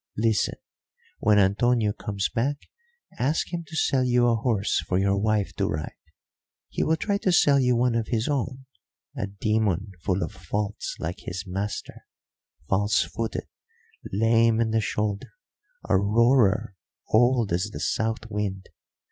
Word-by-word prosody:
Listen. 110 -1 +1 0.6
When 105 -1 +4
Antonio 105 +2 +3
comes 100 -2 -2
back, 140 +5 -1 0.6
ask 150 +7 0
him 170 -1 -2
to 160 - -9
sell 135 -4 +2
you 125 -1 +3
a 115 - +3
horse 110 -3 0
for 90 - +1
your 100 +1 +2
wife 105 0 0
to - - +1
ride. 75 0 -3 0.8
He - - -1
will 160 - +2
try 200 +5 -1
to 190 - +1
sell 145 -5 +5
you 125 -2 +3
one 120 0 +2
of 115 -1 -1
his 115 -1 -1
own, 130 -2 -2 0.5
a - - -3
demon 100 -1 -1
full 95 +2 0
of - - -4
faults 100 +2 -4
like 85 +3 -4
his 90 +2 -6
master; 100 +3 -5 0.6
false 100 +2 +2
footed, 115 -1 -4 0.7
lame 115 +2 +3
in 115 -1 +1
the 110 0 +2
shoulder, 105 -1 -2 0.5
a - - +3
roarer, 110 0 +3 0.3
old 120 -2 +3
as 90 +3 +1
the - - -7
south 110 -1 -1
wind. 100 -3 -4
110 Hz, 150 wpm, -25 LUFS, 100-120 Hz, 0.8 s, sell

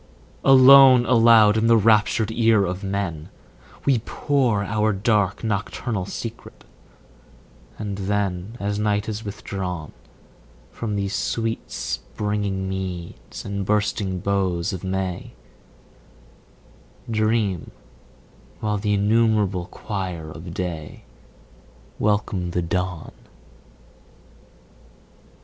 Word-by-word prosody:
Alone, 135 -1 +8
aloud 115 -3 +6
in 110 +1 +2
the 115 0 +6
raptured 110 +1 +3
ear 110 -3 +3
of 90 +2 -4
men 95 -6 -3 0.6
We 135 -4 +3
pour 125 -3 0
our 105 +1 0
dark 100 0 0
nocturnal 105 -1 -2
secret; 115 +2 -8 1.1
and 100 -2 -5
then, 100 +1 -2
As 100 +1 -2
night 105 -1 0
is 110 0 -4
withdrawn 95 -6 -5 0.8
15 - - -22
From 110 -3 -2
these 100 0 -2
sweet 115 +1 -2
springing 95 - -3
meads 95 -3 -6
and 100 0 -3
bursting 100 -2 -1
boughs 95 -4 0
of 95 - -6
May, 95 -1 -3 1.7
Dream, 110 -5 0 0.9
while 105 -1 -1
the 105 0 0
innumerable 105 -3 +2
choir 90 -8 -5
of 85 +2 -9
day 85 -4 -5 1.0
Welcome 100 -4 0
the 85 0 -1
dawn. 90 -2 -3
100 Hz, 95 wpm, -23 LUFS, 95-110 Hz, 1.7 s, Alone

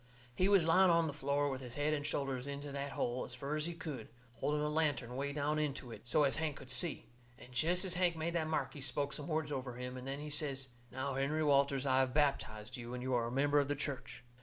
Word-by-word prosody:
He 185 +9 +2
was 195 -5 +6
lying 185 +3 +6
on 170 -1 +4
the 150 - -2
floor 145 0 +1
with 135 -2 -3
his 125 -2 -7
head 145 +1 +1
and 145 -1 -1
shoulders 135 -3 -2
into 140 0 -5
that 140 -1 -4
hole 120 +1 -1
as 125 - -6
fur 140 +4 -3
as 155 +1 0
he 170 - -4
could, 150 -10 -6 0.3
holding 150 0 +1
a - - +1
lantern 145 -6 0
way 140 +2 -1
down 150 +1 0
into 140 -5 -2
it, 115 - -10
so 150 +5 +4
as 140 +1 +2
Hank 155 -2 -1
could 130 -1 -6
see. 155 +6 +2 0.3
And 125 0 -13
jest 175 +9 +2
as 185 - 0
Hank 180 -1 +2
made 165 +1 -2
that 160 -2 0
mark 135 -4 -1
he 145 - -8
spoke 140 +1 -1
some 145 +2 -4
words 155 -2 -1
over 130 -3 -3
him, 125 +1 -5
and 130 +1 -7
then 135 +1 -3
he 150 0 -6
says: 140 -3 -1 0.2
"Now, 130 +2 -2
Henry 140 +4 0
Walters, 140 -2 +3
I 130 -1 +4
have 130 0 +1
baptized 130 -6 0
you, 120 0 -6
and 125 - -5
you 130 0 -1
are 120 -1 +2
a - - -4
member 145 +3 +3
of 140 - +2
the 145 - 0
church." 135 -3 -5
140 Hz, 260 wpm, -35 LUFS, 130-155 Hz, 0.3 s, was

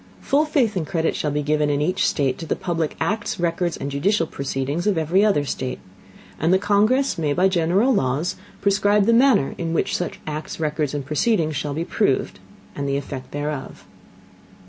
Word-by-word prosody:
Full 290 +3 +2
Faith 255 -8 +1
and 165 -5 -2
Credit 165 -2 0
shall 150 - -1
be 145 0 -1
given 150 0 +1
in 145 -1 +1
each 180 +6 +1
State 135 -3 0
to 165 - -6
the - - 0
public 170 -4 -2
Acts, 210 -2 -2
Records, 170 0 -1
and 140 - -4
judicial 165 +6 +1
Proceedings 140 +3 -3
of 200 -4 +2
every 165 +5 +2
other 195 -9 +2
State. 130 -2 -3 0.6
And 160 +2 +2
the 190 - +6
Congress 210 +4 +2
may 150 -3 +1
by 180 +5 +3
general 190 +7 +2
Laws 140 - 0 0.3
prescribe 205 0 +3
the 230 - +4
Manner 235 - +4
in 165 -1 -2
which - - 0
such 175 - -3
Acts, 155 +1 -5
Records, 150 -2 -1
and 140 -2 -3
Proceedings 155 - +1
shall 145 0 -3
be 165 +2 -2
proved, - - 0 0.4
and 140 -1 -3
the 140 - +1
Effect 135 -2 -6
thereof. 145 -1 -5
165 Hz, 190 wpm, -22 LUFS, 145-200 Hz, 0.6 s, the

